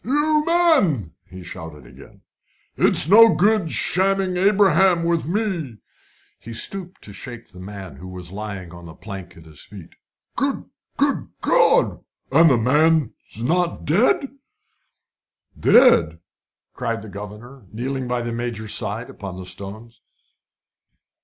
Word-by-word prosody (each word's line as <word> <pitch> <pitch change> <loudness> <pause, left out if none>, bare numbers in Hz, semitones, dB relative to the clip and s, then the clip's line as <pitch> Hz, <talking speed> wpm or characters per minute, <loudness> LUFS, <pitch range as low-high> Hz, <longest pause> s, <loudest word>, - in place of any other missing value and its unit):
"You 300 +4 +1
men!" 280 - +2 0.2
he 95 0 -10
shouted 80 -6 -10
again; - - -16 0.5
"it's - - +3
no 225 +4 +7
good 205 -3 +2
shamming 190 +2 0
Abraham 190 -2 +3
with 170 -1 0
me!" 175 - -2 0.6
He 115 - -10
stooped 185 +9 -3
to 100 - -8
shake 120 0 -10
the 90 - -14
man 95 -1 -9
who 95 - -10
was 90 -2 -9
lying 100 -3 -7
on 85 0 -11
the 80 - -12
plank 95 -4 -10
at 80 - -15
his 75 -3 -12
feet. - - -13 0.4
"Good - - -2 0.3
good - - 0
God! - - +2 0.3
The 150 +5 +5
the 135 -6 +5
man's 140 -2 0
not 175 +6 -1
dead?" 230 - +2 1.3
"Dead!" 235 - +5 0.6
cried 115 -4 -3
the - - -10
governor, 105 +4 -10
kneeling 130 +3 -4
by 125 -1 -2
the 120 - -4
Major's 115 -2 -4
side 110 +4 -1
upon 95 -3 -9
the 95 - -8
stones. 110 +5 -9
120 Hz, 135 wpm, -21 LUFS, -, 1.3 s, no